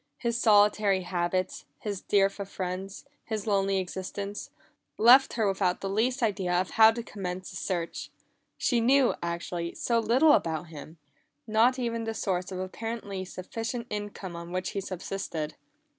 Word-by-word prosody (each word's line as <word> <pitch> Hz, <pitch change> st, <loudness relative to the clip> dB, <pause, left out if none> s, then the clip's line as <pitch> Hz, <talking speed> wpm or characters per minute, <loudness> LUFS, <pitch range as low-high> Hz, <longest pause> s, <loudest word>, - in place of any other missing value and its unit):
His 235 Hz, +8 st, -1 dB
solitary 205 Hz, -3 st, +4 dB
habits, 180 Hz, +1 st, -2 dB
his 205 Hz, -3 st, -4 dB
dearth 195 Hz, 0 st, +2 dB
of 200 Hz, -1 st, -5 dB
friends, 190 Hz, +3 st, -5 dB, 0.2 s
his 215 Hz, -2 st, -4 dB
lonely 195 Hz, -2 st, +2 dB
existence, 190 Hz, +2 st, -4 dB, 0.5 s
left 250 Hz, +4 st, +7 dB
her 220 Hz, -3 st, +1 dB
without 190 Hz, -2 st, 0 dB
the 195 Hz, -, -2 dB
least 245 Hz, +5 st, +1 dB
idea 195 Hz, -5 st, 0 dB
of 185 Hz, -, -2 dB
how 220 Hz, 0 st, +8 dB
to 230 Hz, +1 st, -2 dB
commence 185 Hz, -4 st, -6 dB
a -, -, -10 dB
search. 170 Hz, -3 st, -3 dB, 0.5 s
She 240 Hz, -3 st, +2 dB
knew, 260 Hz, +2 st, +4 dB
actually, 170 Hz, 0 st, -3 dB
so 235 Hz, -1 st, +1 dB
little 250 Hz, +8 st, +4 dB
about 160 Hz, -, 0 dB
him 155 Hz, +1 st, -10 dB, 0.5 s
not 225 Hz, +4 st, +3 dB
even 230 Hz, -2 st, -2 dB
the 225 Hz, 0 st, -3 dB
source 185 Hz, -3 st, -2 dB
of 185 Hz, -, -4 dB
the 185 Hz, -, -2 dB
apparently 205 Hz, -1 st, -5 dB
sufficient 225 Hz, +6 st, -5 dB
income 205 Hz, -3 st, -5 dB
on 170 Hz, 0 st, -8 dB
which 185 Hz, 0 st, -2 dB
he 200 Hz, -, -3 dB
subsisted. 185 Hz, -4 st, -4 dB
195 Hz, 160 wpm, -28 LUFS, 185-225 Hz, 0.5 s, how